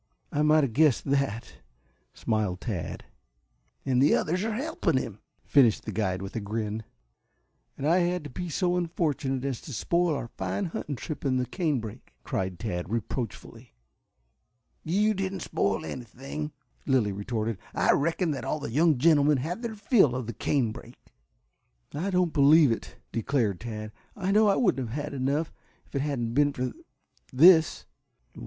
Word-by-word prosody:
"I 145 - 0
might 155 0 +5
have 130 -5 -1
guessed 150 -2 +3
that," 135 -5 -1 0.5
smiled 105 -5 -1
Tad. 95 -9 -4 0.8
"And 130 -2 +2
the 145 - +5
others 180 +5 0
are 220 -1 -1
helping 255 - 0
him," 110 -5 -4 0.2
finished 125 -7 +4
the - - -4
guide 95 -3 -1
with 95 +3 -7
a - - 0
grin. 110 +1 -3 0.9
"And 140 - -2
I 170 +3 +4
had 180 -1 0
to 145 - -7
be 175 +6 -5
so 180 +2 +1
unfortunate 150 -6 -1
as 135 -4 -3
to 150 - -9
spoil 170 +6 +1
our 125 - -4
fine 95 0 -3
hunting 150 -3 -4
trip 155 +4 -6
in 130 -2 +1
the 125 - 0
canebrake," 125 - -3
cried 95 -1 -2
Tad 90 -5 -4
reproachfully. 115 - -5 1.1
"You 205 +6 +2
didn't 190 -1 -3
spoil 100 -9 -1
anything," 135 +6 -6 0.4
Lilly 125 -7 +2
retorted. 110 +1 -3 0.2
"I - - +4
reckon 165 +3 +1
that 140 - -4
all 155 - -2
the 125 - -5
young 155 +2 +3
gentlemen 145 0 +4
had 165 - -3
their 230 -2 -4
fill 205 - +3
of 125 -2 -3
the 120 - -5
canebrake." 120 0 -2 1.0
"I 170 +7 -2
don't 180 -3 +1
believe 145 -1 +6
it," 115 - -4
declared 115 -5 0
Tad. 110 -2 -6 0.2
"I 195 -2 -1
know 215 +1 +5
I 200 - +4
wouldn't 135 - +1
have 130 +7 -3
had 150 - -6
enough, 140 +4 -1 0.3
if - - -29
it 140 - 0
hadn't 130 -6 -2
been 145 +2 +3
for 125 -1 -2 0.6
this." 160 +4 +6
140 Hz, 160 wpm, -27 LUFS, 115-165 Hz, 1.1 s, believe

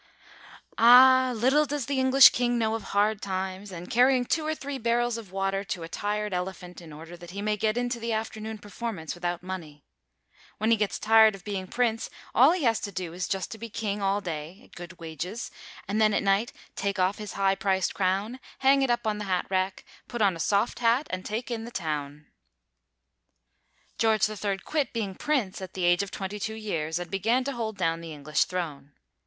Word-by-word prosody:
Ah, 255 +2 +8
little 265 +7 +3
does 285 -3 -2
the 275 +1 -1
English 260 +1 +8
king 245 0 0
know 220 -1 +1
of 225 - -2
hard 205 +1 +1
times 190 +1 -4
and 175 -1 -8
carrying 250 +1 +4
two 315 +5 0
or 310 0 -1
three 280 -2 -6
barrels 240 0 +1
of 220 -5 -8
water 195 0 -1
to 180 -3 -4
a - - -6
tired 210 +3 -2
elephant 180 0 -5
in 165 -2 -12
order 160 +3 -10
that 175 0 -12
he 195 +3 -7
may 210 0 +1
get 215 +2 0
into 245 0 -1
the 230 0 -3
afternoon 220 0 -4
performance 205 -5 -6
without 175 0 -3
money. 160 -6 -7 0.7
When 220 +2 +1
he - - +7
gets 210 -3 -1
tired 220 -1 +5
of 190 - -14
being 195 -3 -4
prince, 230 +1 0 0.2
all 260 +6 +7
he 350 -3 -1
has 225 -3 +3
to 205 - -5
do 180 -3 -5
is 180 +2 -3
just 195 -2 -3
to 220 - -8
be 230 +1 -7
king 205 -1 -3
all 195 +1 +1
day 165 0 -6
at - - -21
good 175 +1 -10
wages, 170 +7 -6 0.4
and 210 +3 0
then 215 -1 +4
at - - +1
night 200 +4 +2 0.2
take 200 0 -2
off 185 +3 +1
his 210 -1 -6
high 195 -1 +2
priced 190 -1 0
crown, 200 +6 -1 0.2
hang 275 +1 +4
it 270 - +1
up 240 -1 0
on 210 -1 -1
the 210 - -4
hat 185 -2 0
rack, 185 0 -1 0.2
put 240 - -5
on 200 -4 +3
a - - -9
soft 200 +7 +1
hat 240 +4 +3
and 185 0 -3
take 230 +4 -4
in 225 -1 -3
the 235 - -7
town. 150 -7 -4 1.7
George 220 -2 +3
III 205 -2 -2
quit 295 -5 -1
being 215 -5 -2
prince 225 -6 -1
at 190 -1 -8
the 185 - -3
age 175 +2 +4
of 200 - -4
22 205 +3 -4
years, 165 -7 -3
and 175 0 -6
began 225 +7 +1
to 280 - -2
hold 225 -4 -4
down 165 -2 0
the 165 -1 -7
English 150 +1 0
throne. 145 -6 -5
205 Hz, 210 wpm, -27 LUFS, 185-230 Hz, 1.7 s, Ah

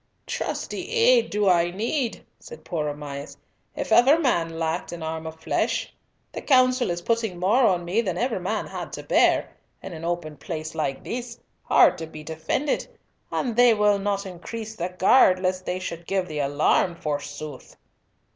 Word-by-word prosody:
"Trusty - - -4
aid 470 +1 +4
do 205 -1 0
I 175 -2 +4
need," 230 - -2
said 475 - -12
poor 160 -4 -2
Sir - - -1
Amias, 145 -1 -7 0.4
"if - - -4
ever 270 +6 +6
man 170 - 0
lacked 165 +1 -2
an 170 -1 -6
arm 160 0 -4
of 160 0 -9
flesh. - - -1 0.4
The - - -6
Council 255 -3 +3
is 175 0 -3
putting 225 -4 0
more 200 +9 +3
on 175 -3 +1
me 190 +7 +1
than 185 -6 -3
ever 240 -1 0
man 180 - -2
had - - -7
to - - -6
bear, - - +3 0.3
in - - -8
an 160 0 -8
open 170 -3 -3
place 155 +2 -6
like 135 -3 -2
this, 240 -1 -5 0.2
hard - - +4
to 160 - -5
be 155 -1 -10
defended, 160 - -2 0.4
and 240 -4 -1
they 245 -1 +6
will 210 -1 +3
not 200 0 -1
increase 215 +5 -7
the 175 -2 -3
guard 185 +1 +5
lest 185 0 -2
they 180 - -1
should 170 -2 -6
give 190 -2 0
the 155 -3 -4
alarm, 145 +5 +2
forsooth!" 145 -2 -6
180 Hz, 175 wpm, -24 LUFS, 160-230 Hz, 0.4 s, ever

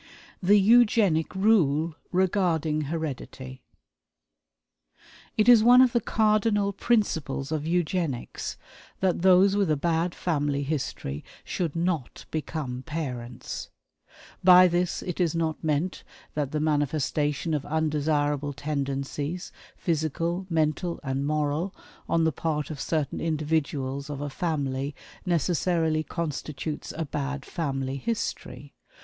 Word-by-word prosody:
The 200 +3 +5
Eugenic 210 -7 +4
Rule 170 -6 +3 0.2
Regarding 175 -5 +1
Heredity. 135 -4 -5 1.8
It 215 +1 +3
is 235 -3 +8
one 245 +2 +8
of 255 -2 +6
the 235 - +1
cardinal 210 -2 +2
principles 160 - 0
of 155 -1 -2
Eugenics 170 -6 -2 0.4
that 185 -3 +1
those 190 +2 +6
with 200 -4 +2
a 155 - +2
bad 170 +3 0
family 145 -4 0
history 135 - -3 0.2
should 170 -4 -3
not 165 -6 -2
become 150 -5 -3
parents. 130 -6 -5 0.7
By 180 0 +9
this 175 0 0
it 180 -1 -5
is 170 -3 +1
not 160 -1 -1
meant 160 +4 -1 0.3
that 145 -2 -2
the 155 - -1
manifestation 150 +1 0
of 145 -3 0
undesirable 145 -2 0
tendencies, 140 +3 -3 0.3
physical, 170 +3 -1
mental, 165 +1 0
and 135 0 -2
moral, 155 +4 -1 0.3
on 165 0 +3
the 160 - +3
part 150 -1 -2
of 145 - -6
certain 155 -4 -1
individuals 150 -3 -1
of 145 -2 -4
a 145 0 -4
family 140 -3 -2 0.3
necessarily 165 -1 +1
constitutes 155 -2 -4
a 165 - -1
"bad 140 -1 -4
family 135 -4 -3
history." 140 - -4
155 Hz, 115 wpm, -27 LUFS, 145-180 Hz, 1.8 s, By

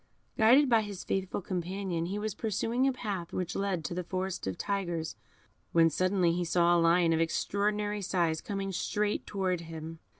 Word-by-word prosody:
Guided 250 +6 +6
by 230 -3 +4
his 205 -3 -6
faithful 190 0 -2
companion, 180 -1 -2
he 195 +3 -3
was 210 0 -2
pursuing 230 +5 0
a - - +3
path 200 -9 -4
which 180 -2 -3
led 195 -5 -1
to - - -3
the 180 +1 -3
Forest 185 - -3
of 95 - -3
Tigers, 175 -5 -2 0.6
when 165 -1 +5
suddenly 185 -1 +2
he 175 +1 0
saw 175 0 +3
a 170 - +4
lion 165 0 +4
of 160 - +2
extraordinary 205 +4 0
size 170 -4 0
coming 195 -1 -3
straight 210 +3 -1
towards 185 -4 -1
him. 160 0 -8
185 Hz, 175 wpm, -30 LUFS, 170-205 Hz, 0.6 s, Guided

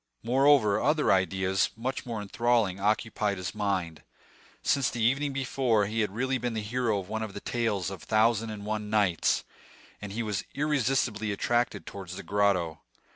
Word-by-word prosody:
Moreover, 130 -4 +4
other 150 0 +2
ideas, 95 0 +2
much 130 +3 -3
more 110 -3 -3
enthralling, 115 -2 +1
occupied 105 0 0
his 90 -1 -4
mind. 95 -6 -2 0.6
Since, 140 -3 +2
the 115 - -3
evening 135 +5 +2
before, 130 -5 +1
he 110 +3 -2
had 105 - 0
really 130 +2 0
been 120 -2 -2
the 110 - -2
hero 115 0 0
of 95 -2 -5
one 110 +2 -3
of 110 -3 -5
the - - -4
tales 105 -5 -1
of 95 - -7
the - - -14
Thousand 110 0 +3
and 105 -1 -7
One 105 0 -3
Nights, 100 -6 +2 0.6
and 105 -1 -6
he 115 +3 -2
was 105 -3 -2
irresistibly 130 -7 0
attracted 120 +4 0
towards 95 -2 -8
the 100 - -7
grotto. 90 -4 +1
110 Hz, 175 wpm, -28 LUFS, 100-120 Hz, 0.6 s, Moreover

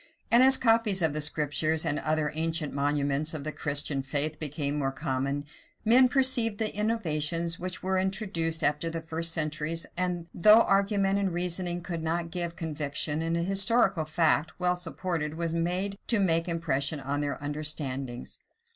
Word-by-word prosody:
And 235 - +6
as 265 +1 +7
copies 225 -6 +2
of 160 -3 +1
the 155 - -3
Scriptures 155 +1 0
and 145 - 0
other 155 -1 -1
ancient 160 -1 -2
monuments 145 +2 0
of 145 - -5
the 155 - -3
Christian 145 -2 -1
faith 145 +3 -1
became 150 -1 -3
more 135 -1 -1
common, 135 +2 -3 0.4
men 250 +3 +6
perceived 250 -5 +3
the 215 -2 -2
innovations 170 -6 -1
which 185 +1 -5
were 190 0 0
introduced 190 -4 -1
after 150 +3 0
the 165 0 -5
first 165 +1 -1
centuries; 155 0 0
and 175 -1 -2
though 215 +6 +6
argument 195 -1 +1
and 195 -2 0
reasoning 175 0 0
could 170 -3 -5
not 165 +1 -2
give 170 -1 -4
conviction, 150 -1 -2
an 165 +1 -1
historical 195 0 +2
fact, 155 -1 +1
well 180 0 +2
supported, 165 -3 -3
was 165 0 -2
able 180 +4 -1
to 230 - +2
make 165 -3 +1
impression 155 -3 -1
on 140 +2 -3
their 145 -1 -2
understandings. 145 -4 -3
165 Hz, 160 wpm, -28 LUFS, 150-185 Hz, 0.4 s, as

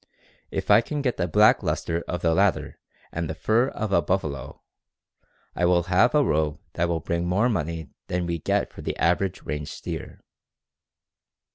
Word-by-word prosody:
If - - -2
I - - +8
can 145 +3 -4
get 125 -3 0
the 90 - 0
black 105 +6 +5
luster 85 0 -2
of 90 - -4
the 80 -1 +3
latter 95 +1 +1 0.3
and 85 -1 -3
the 80 - -3
fur 115 +8 +2
of 110 -6 -4
a 85 - +4
buffalo, 75 -6 -3 0.9
I 90 - +1
will 85 0 +3
have 95 - +3
a 150 - +5
robe 75 - 0
that 85 0 0
will 85 -2 -1
bring 85 +2 -2
more 100 +7 +2
money 80 - -3 0.2
than 90 0 -1
we 85 -1 -2
get - - -1
for - - -9
the - - -4
average 90 +2 0
range 75 0 -4
steer." - - -7
85 Hz, 175 wpm, -25 LUFS, 80-100 Hz, 0.9 s, I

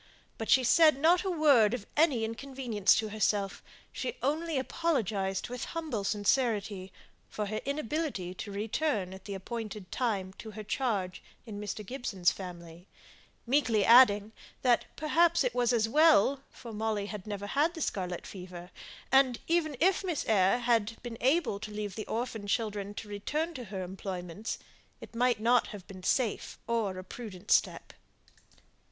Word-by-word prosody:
But 225 - -4
she 260 - +6
said 310 +3 +6
not 340 +5 +4
a 385 - -1
word 280 - +4
of 215 -5 -8
any 290 -7 +3
inconvenience 230 -3 +1
to 220 0 -1
herself; 205 -2 0 0.3
she 475 - -4
only 315 +1 0
apologized 220 - -1
with 245 0 -5
humble 300 -11 -2
sincerity 205 -2 0 0.4
for 210 - -3
her 215 +2 -3
inability 280 - -2
to 200 +2 -7
return 210 -1 -1
at 190 0 -12
the 200 - -5
appointed 210 -1 -6
time 200 -7 -1
to 220 - -8
her 215 0 -8
charge 205 -5 -2 0.2
in 210 -3 -7
Mr. 210 0 -5
Gibson's 200 -7 0
family; 175 -1 -9 0.6
meekly 235 -6 +2
adding, 220 -4 +7 0.3
that 245 -2 +3
perhaps 335 +1 +3
it 250 -2 0
was 245 -1 +2
as 225 -2 +2
well, 280 -1 +5
for 230 -2 -10
Molly 215 -1 -1
had 210 -1 -7
never 205 -1 -4
had 295 - +1
the 325 - -6
scarlet 180 - -3
fever, 180 -2 -9 0.4
and 265 -2 +5
even 325 -4 +1
if 375 +4 +3
Miss 350 -6 -2
Eyre 195 0 +4
had 230 -2 +1
been 235 -2 -7
able 270 -5 +2
to 215 +1 -6
leave 210 -1 -4
the 215 +2 -6
orphan 225 -3 -3
children 205 -2 -2
to 210 - -7
return 295 +12 -2
to 250 -5 -7
her 190 -2 -5
employments, 185 +1 -5 0.4
it - - -12
might 240 -1 +2
not 240 +2 +3
have 200 -4 -9
been 190 -1 -10
a - - -15
safe 230 +3 0
or 220 -5 -1
a 185 - -6
prudent 200 -1 -8
step. - - +2
220 Hz, 160 wpm, -30 LUFS, 200-265 Hz, 0.6 s, adding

